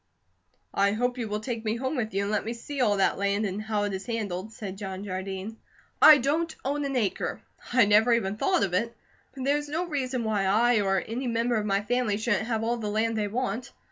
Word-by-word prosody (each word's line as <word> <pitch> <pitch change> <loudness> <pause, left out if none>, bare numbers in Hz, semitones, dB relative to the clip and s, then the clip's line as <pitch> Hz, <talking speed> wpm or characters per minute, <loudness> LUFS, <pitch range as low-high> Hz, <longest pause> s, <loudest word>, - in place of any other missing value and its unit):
"I 200 0 +2
hope 245 +3 -1
you 230 - -2
will 210 0 -3
take 230 -1 -4
me 220 0 0
home 260 +4 -2
with 225 -4 -2
you, 200 - +1
and 200 - -2
let 210 - 0
me 225 +3 -3
see 275 +4 -5
all 205 -4 +3
that 195 - +2
land, 200 +2 +1
and 200 +1 -3
how 215 -1 -1
it 205 -1 -2
is 190 +4 -5
handled," 215 -3 -3
said 200 -4 -7
John 190 -1 -5
Jardine. 190 +2 -5 0.4
"I 305 - +10
don't 315 +5 0
own 285 +1 -1
an 275 -1 -2
acre. 215 -6 -1 0.3
I 245 -2 +5
never 210 +3 +5
even 225 -5 +2
have 210 - -11
thought 375 -2 +2
of 185 - -1
it, 230 +5 -1 0.4
but 265 - -5
there 280 +2 +2
is 295 0 -5
no 325 +4 -1
reason 260 -6 -2
why 210 -3 0
I, 220 +3 +3
or 195 -1 +2
any 245 +3 -3
member 235 +1 0
of 210 -1 -1
my 200 0 +1
family 240 -2 0
shouldn't 215 -1 0
have 225 -2 -1
all 235 +1 0
the 215 -3 -3
land 220 +2 0
they 210 -1 0
want. 245 +1 -3
220 Hz, 240 wpm, -27 LUFS, 205-245 Hz, 0.4 s, I